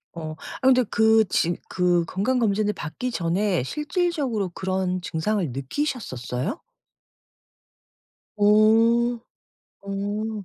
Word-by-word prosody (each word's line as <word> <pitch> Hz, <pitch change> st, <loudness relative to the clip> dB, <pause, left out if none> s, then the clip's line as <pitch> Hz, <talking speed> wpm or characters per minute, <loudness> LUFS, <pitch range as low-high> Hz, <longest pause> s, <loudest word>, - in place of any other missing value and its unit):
어. 155 Hz, -2 st, -6 dB, 0.3 s
아 260 Hz, -, +2 dB
근데 255 Hz, -1 st, +5 dB
그 220 Hz, 0 st, +4 dB
지 175 Hz, -1 st, 0 dB
그 175 Hz, -2 st, +1 dB
건강 205 Hz, +10 st, -1 dB
검진을 210 Hz, -1 st, +1 dB
받기 245 Hz, +11 st, -5 dB
전에 180 Hz, -, 0 dB
실질적으로 295 Hz, -, -1 dB
그런 185 Hz, 0 st, -2 dB
증상을 175 Hz, -, -1 dB
느끼셨었어요? 135 Hz, -, -3 dB, 1.7 s
어. 225 Hz, +3 st, +4 dB, 0.6 s
어. 205 Hz, +2 st, -4 dB
205 Hz, 195 characters per minute, -24 LUFS, 175-230 Hz, 1.7 s, 근데